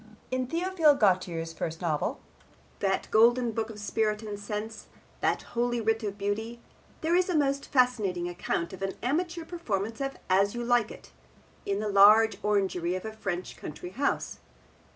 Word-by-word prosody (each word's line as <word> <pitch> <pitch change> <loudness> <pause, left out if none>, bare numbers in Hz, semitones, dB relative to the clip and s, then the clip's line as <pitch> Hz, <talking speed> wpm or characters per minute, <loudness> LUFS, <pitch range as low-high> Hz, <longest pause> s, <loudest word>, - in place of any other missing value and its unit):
In 255 0 -1
Theophile 335 -1 +3
Gautier's 180 -7 +1
first 165 0 -4
novel, 160 -4 -1 0.6
that 195 -1 0
golden 235 +2 +4
book 225 0 -2
of 220 - -9
spirit 215 +1 -1
and 205 -2 -6
sense, 210 +1 -5 0.3
that - - 0
holy 240 0 0
writ 225 0 +1
of 205 -2 -4
beauty, 220 +4 -3 0.4
there 325 +2 +1
is 365 +1 +2
a 350 - +2
most 280 -1 0
fascinating 215 -9 +1
account 175 0 -3
of 190 - -9
an 195 0 -2
amateur 335 +6 -1
performance 225 - -3
of 275 0 -3
As 195 +3 +3
You 240 - -3
Like 240 -2 +2
It - - -12 0.6
in 200 0 0
the 215 - -2
large 210 +2 +6
orangery 190 -4 +1
of 185 - -5
a 220 - -5
French 195 -4 -4
country 175 +4 -8
house. 280 +8 -1
215 Hz, 165 wpm, -28 LUFS, 195-245 Hz, 0.6 s, large